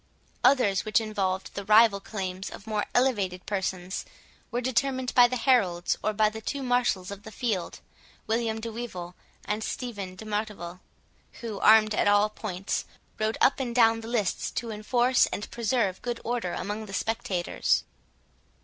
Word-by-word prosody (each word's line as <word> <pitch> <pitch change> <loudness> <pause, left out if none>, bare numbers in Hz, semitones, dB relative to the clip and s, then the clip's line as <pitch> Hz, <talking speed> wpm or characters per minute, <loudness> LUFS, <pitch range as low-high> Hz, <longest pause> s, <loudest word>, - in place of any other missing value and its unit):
Others, 250 -8 +4
which 215 - +3
involved 195 -4 -2
the 200 - -5
rival 210 0 +6
claims 190 -2 -5
of 200 - -11
more 215 -2 -1
elevated 205 -8 +1
persons, 190 -2 -3 0.5
were 240 - -1
determined 260 +1 0
by 245 -1 +7
the 255 - -3
heralds, 200 -10 +2
or 215 - +2
by 215 0 +3
the 220 +1 -5
two 275 +5 -3
marshals 245 -7 +1
of 200 0 -7
the 220 - -10
field, 210 -6 -2 0.4
William 225 0 0
de 230 +1 -5
Wyvil, 185 -7 -6 0.3
and 210 +1 -2
Stephen 205 -8 -5
de 220 - -10
Martival, 205 -5 -4 0.6
who, 220 -4 -5
armed 215 0 +6
at 205 - +2
all 205 +1 +4
points, 195 -3 -3 0.4
rode 215 +1 0
up 275 - +4
and 240 -3 -3
down 225 -2 +5
the 225 - -8
lists 225 -6 -1
to 230 -1 -4
enforce 240 +4 +2
and 205 - -5
preserve 230 -5 0
good 240 -1 -3
order 230 -7 -2
among 215 +1 -4
the 195 - -9
spectators. 190 -4 0
215 Hz, 160 wpm, -27 LUFS, 195-235 Hz, 0.6 s, by